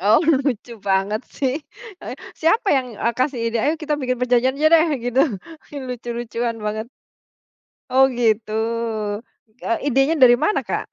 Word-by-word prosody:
Oh 210 +4 +5
lucu 270 -6 0 0.2
banget 195 +3 +1 0.2
sih, 265 -2 0 0.5
eh, - - -6 0.3
siapa 400 +7 +2
yang, 260 -1 0
eee, 235 - +1
kasih 255 -1 0
ide, 230 - -1
"Ayo 300 - +2
kita 305 -1 0
bikin 255 -1 -1
perjanjian 250 +1 +2
aja 305 +2 +2
deh," 325 0 +5 0.2
gitu 245 +2 +2 0.7
lucu-lucuan 240 -1 -4
banget. 215 +1 -3 1.0
Oh 265 +1 +6
gitu, 230 -4 0 1.1
eee, 230 - 0
idenya 270 +5 +3
dari 245 -2 +8
mana, 420 - +1
Kak? - - -4
250 Hz, 145 wpm, -21 LUFS, 230-270 Hz, 1.1 s, dari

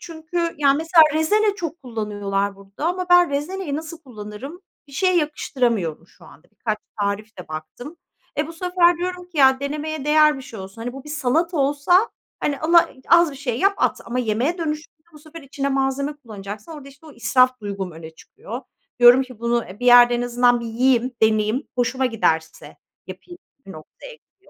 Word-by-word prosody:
Çünkü 335 +1 -4
yani 280 -2 +4
mesela 325 +2 +5
rezene 410 +7 +2
çok 335 -4 -6
kullanıyorlar 205 -4 -3
burada 200 +10 -7
ama 360 +1 -2
ben 355 -2 +6
rezeneyi 295 +2 -3
nasıl 320 +1 -7
kullanırım. 250 - -9 0.3
Bir - - -16
şeye 370 +5 +1
yakıştıramıyorum 240 - -1
şu - - -21
anda. 175 - -18
Birkaç 215 +1 -3 0.2
tarif 205 +2 -3
de 180 - -10
baktım. 160 - -8 0.4
E, 300 - +1
bu 330 - -9
sefer 350 0 +2
diyorum 360 0 -5
ki, 340 -4 -8
"Ya 265 -1 +5
denemeye 300 +1 -4
değer 300 -1 +4
bir 270 - -8
şey 230 -4 -10
olsun." 195 +4 -9
Hani, 245 +1 -4
bu 270 +1 -10
bir - - -11
salata 305 +4 0
olsa, 290 +9 +2 0.3
hani, 285 -2 -2
ala 335 +2 +4 0.2
az 340 -1 +5
bir 275 - -10
şey 250 -4 -3
yap 395 +5 +3
at. - - 0
Ama 240 +2 -4
yemeğe 250 - -1
dönüşünce 310 -1 -5
bu 300 - -14
sefer 310 +2 -12
içine 275 0 -3
malzeme 275 +2 -1
kullanacaksın 215 0 -9
orada 290 -3 -10
işte 280 +3 -18
o 305 - -12
israf 255 +1 +2
duygum 200 -2 -5
öne 160 0 -10
çıkıyor. 425 - -10 0.4
Diyorum 245 +2 +7
ki 255 -4 -12
bunu, 235 0 0
e, 195 +5 -12
bir 245 - -2
yerde 245 0 +7
en 240 - -1
azından 245 0 +2
bir 235 - -6
yiyeyim, 250 +2 +1
deneyeyim, 220 +4 +2
hoşuma 255 +1 0
giderse 160 -9 -2 0.3
yapayım 350 -1 -11 0.3
bir 195 - -9
noktaya 160 - -12
gidiyorum. 465 - -29
270 Hz, 185 wpm, -21 LUFS, 230-320 Hz, 0.4 s, Diyorum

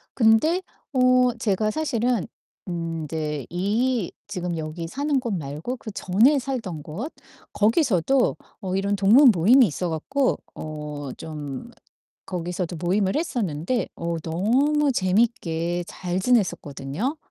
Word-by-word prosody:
근데 245 +10 +4 0.3
어 255 -1 +4
제가 215 -1 +1
사실은 245 - 0 0.4
음 165 -2 -3
인제 150 -3 -3
이 210 +4 0 0.2
지금 180 -4 -3
여기 160 +1 -5
사는 280 - 0
곳 235 -4 -3
말고 155 - -4
그전에 220 +6 +2
살던 225 - -4
곳 210 - -6 0.4
거기서도 240 - +2 0.3
어 190 -2 -2
이런 200 +1 +1
동문 230 +7 +7
모임이 225 +9 +6
있어 175 +3 -3
갖고 260 - 0 0.2
어 150 -2 -6
좀 150 - -7 0.6
거기서도 175 -1 -3
모임을 190 +2 +1
했었는데 235 - -1
어 170 0 -2
너무 260 - +2
재밌게 180 -5 0
잘 180 0 -3
지냈었거든요. 190 - 0
195 Hz, 240 characters per minute, -24 LUFS, 165-250 Hz, 0.6 s, 동문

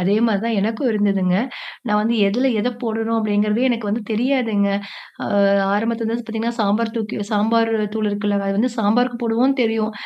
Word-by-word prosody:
அதே 190 +3 +2
மாரி 215 -4 +1
தான் 230 -1 0
எனக்கும் 225 +5 -1
இருந்ததுங்க. 195 -4 +1 0.5
நான் 210 -1 +2
வந்து 230 +2 +1
எதுல 245 +7 +1
எத 245 - 0
போடணும் 225 0 -1
அப்படிங்கிறதே 210 +2 +1
எனக்கு 230 -3 -1
வந்து 220 +3 -1
தெரியாதுங்க. 225 -3 +1 0.6
ஆ, - - -4 0.5
ஆரம்பத்துல 225 +1 -1
வந்து 235 -1 -4
பாத்தீங்கன்னா, 225 +1 -3
சாம்பார் 220 +2 +1
தூக்கி 215 -1 -4
சாம்பார் 225 +2 +2 0.2
தூள் 215 -1 0
இருக்குல்லங்க, 205 -1 -1
அது 195 - -1
வந்து 245 +4 +1
சாம்பாருக்கு 235 +3 +1
போடுவோம்னு 240 +4 +2
தெரியும். 220 -1 0
225 Hz, 165 wpm, -20 LUFS, 205-230 Hz, 0.6 s, அதே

